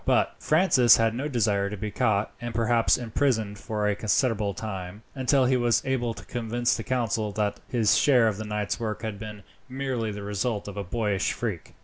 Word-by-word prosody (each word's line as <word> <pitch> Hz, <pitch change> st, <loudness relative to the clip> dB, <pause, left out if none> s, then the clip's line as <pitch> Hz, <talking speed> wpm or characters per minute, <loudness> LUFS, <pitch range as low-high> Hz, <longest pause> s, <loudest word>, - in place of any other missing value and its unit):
But -, -, +2 dB
Francis 155 Hz, -7 st, +5 dB
had 115 Hz, 0 st, +2 dB
no 130 Hz, +5 st, -3 dB
desire 105 Hz, -7 st, +1 dB
to 105 Hz, -, -6 dB
be 105 Hz, +1 st, -4 dB
caught, 105 Hz, 0 st, +1 dB
and 120 Hz, -1 st, -5 dB
perhaps 115 Hz, 0 st, +3 dB
imprisoned 110 Hz, -4 st, -1 dB
for 105 Hz, 0 st, -2 dB
a 105 Hz, -, +1 dB
considerable 105 Hz, -2 st, 0 dB
time, 95 Hz, -1 st, -6 dB
until 130 Hz, 0 st, +2 dB
he 130 Hz, +1 st, +3 dB
was 120 Hz, -1 st, +2 dB
able 120 Hz, -3 st, -1 dB
to -, -, -11 dB
convince 120 Hz, 0 st, -1 dB
the 115 Hz, -, -4 dB
council 115 Hz, -4 st, -1 dB
that 105 Hz, 0 st, -1 dB
his 115 Hz, -4 st, +2 dB
share 125 Hz, -5 st, +4 dB
of 105 Hz, -3 st, -1 dB
the 110 Hz, -, -5 dB
night's 105 Hz, -4 st, -2 dB
work 110 Hz, -1 st, -4 dB
had 110 Hz, -3 st, -4 dB
been 105 Hz, -2 st, -8 dB, 0.3 s
merely 130 Hz, -4 st, -2 dB
the 105 Hz, 0 st, -7 dB
result 105 Hz, +1 st, -2 dB
of 100 Hz, -, -7 dB
a 100 Hz, -, -3 dB
boyish 105 Hz, +1 st, -1 dB
freak. -, -, -5 dB
110 Hz, 200 wpm, -26 LUFS, 105-120 Hz, 0.3 s, Francis